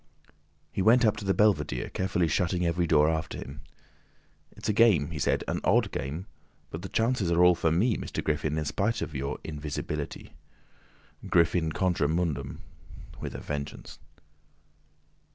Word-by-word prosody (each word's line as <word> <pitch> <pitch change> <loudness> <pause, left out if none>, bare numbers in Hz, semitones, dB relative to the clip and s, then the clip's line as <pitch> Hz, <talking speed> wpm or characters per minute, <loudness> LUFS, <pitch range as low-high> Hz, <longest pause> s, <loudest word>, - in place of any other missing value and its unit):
He - - -2
went 120 +5 +5
up 105 - +3
to 100 - -6
the 95 - +2
belvedere, 75 - +1
carefully 90 -2 0
shutting 90 +3 0
every 85 +1 +1
door 75 -1 +4
after 80 0 -2
him. 70 +3 -8 0.9
"It's - - -8
a 105 - +2
game," 100 -9 +4
he 80 - -5
said, - - +1
"an - - -2
odd - - +3
game—but 80 +2 -7
the 95 - -7
chances 115 -5 +1
are 85 +1 +4
all 90 - +7
for 80 -2 0
me, 105 +8 +2
Mr. - - -4
Griffin, 75 0 -1
in 75 - -1
spite 100 +9 -1
of - - -6
your 70 0 -3
invisibility. 75 -1 -5 0.9
Griffin 85 -1 +2
contra 90 -4 +1
mundum... 75 -5 -2 0.6
with - - -6
a - - -6
vengeance." 70 -1 -6
85 Hz, 150 wpm, -28 LUFS, 75-95 Hz, 0.9 s, all